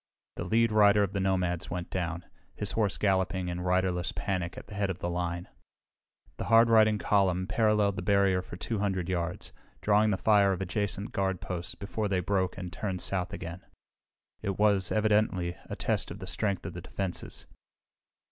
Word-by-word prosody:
The - - -3
lead 115 0 +3
rider 105 -1 +5
of 100 -1 -2
the 100 - -1
nomads 90 -3 0
went 90 0 -5
down, 85 -2 -3 0.3
his 105 -2 -2
horse 105 0 +1
galloping 95 -2 +1
in 90 0 -4
riderless 90 -1 +1
panic 90 -3 -3
at - - -8
the 105 - -11
head 100 -1 -1
of 95 - -3
the 85 -1 -3
line. 85 0 -3 0.9
The - - -4
hard 115 0 +5
riding 110 -1 +5
column 95 -3 +2
paralleled 105 -1 +2
the - - -2
barrier 100 0 +3
for 90 - -9
200 95 -4 -2
yards, 90 -1 -3 0.3
drawing 105 +1 +3
the 100 - +1
fire 100 -1 +4
of 90 - -4
adjacent 100 +2 -2
guard 95 -2 -1
posts 90 -2 -4
before 105 +1 -3
they 95 -2 +1
broke 95 0 0
and 90 -2 -6
turned 95 0 -3
south 95 -1 0
again. 85 +1 -6 0.8
It 100 -2 -2
was, 100 -3 +2
evidently, 105 -5 +1
a - - -3
test - - -1
of - - -7
the - - -8
strength 100 -3 -1
of - - -5
the - - -7
defenses. 95 -3 -4
95 Hz, 180 wpm, -29 LUFS, 90-105 Hz, 0.9 s, rider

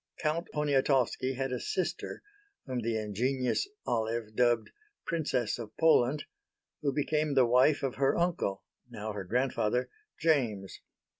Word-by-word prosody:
Count 165 +2 -1
Poniatowski 135 -3 +1
had 135 0 -2
a 125 - -1
sister 185 - -3 0.4
whom 130 -2 -2
the 115 -1 -1
ingenious 125 - 0 0.2
Olive 110 -1 -1
dubbed 120 -2 +2 0.3
"Princess 135 -9 -1
of 110 -2 -8
Poland" 150 -3 +4 0.6
who 145 -2 +1
became 150 +1 0
the 130 -2 +6
wife 130 +5 +4
of 135 -2 -2
her 135 0 +2
uncle 170 - 0 0.3
(now 105 +1 -5
her 100 -1 -4
grandfather) 125 +2 0 0.3
James. 120 - 0
130 Hz, 130 wpm, -30 LUFS, 115-145 Hz, 0.6 s, the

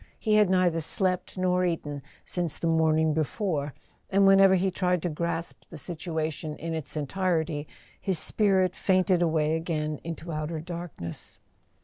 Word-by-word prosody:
He 215 - 0
had 210 -3 +5
neither 180 -3 +2
slept 185 +3 0
nor 180 0 +2
eaten 150 -5 -2 0.2
since 170 -4 -1
the - - -4
morning 160 -1 +3
before, 155 -2 -1 0.3
and 195 +1 +4
whenever 195 0 +7
he 190 +1 +1
tried 180 -2 0
to 175 - 0
grasp 165 +1 -3
the 165 - -9
situation 160 -2 -4
in 165 +1 -5
its 160 -1 -3
entirety 160 -1 -1 0.3
his 190 -3 0
spirit 190 +2 +2
fainted 185 -1 +2
away 160 -2 +2
again 155 -2 -2
into 165 0 -6
outer 155 +1 -3
darkness. 170 - -6
165 Hz, 145 wpm, -27 LUFS, 155-185 Hz, 0.3 s, whenever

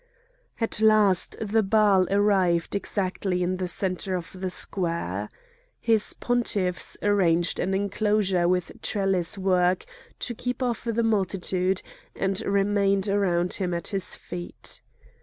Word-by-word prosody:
At 225 -2 0
last 215 -4 +4
the 220 +1 +1
Baal 200 -2 +3
arrived 195 -4 +2
exactly 190 -2 -1
in 185 +1 -1
the 185 -1 -2
centre 185 +1 -1
of 175 -2 -5
the 185 0 -4
square. 170 - -2 0.5
His 225 -2 +2
pontiffs 205 -7 0
arranged 180 -5 +2
an 190 +1 0
enclosure 200 -2 +1
with 180 -1 0
trellis 195 -2 +1
work 185 -1 +1 0.4
to 240 - -3
keep 245 +2 -3
off 240 -1 -2
the 230 0 0
multitude, 190 -3 0 0.3
and 195 0 -1
remained 200 0 +1
around 180 -3 +1
him 180 -2 0
at 170 - -1
his 195 -2 -1
feet. 175 0 -8
195 Hz, 125 wpm, -25 LUFS, 180-205 Hz, 0.5 s, last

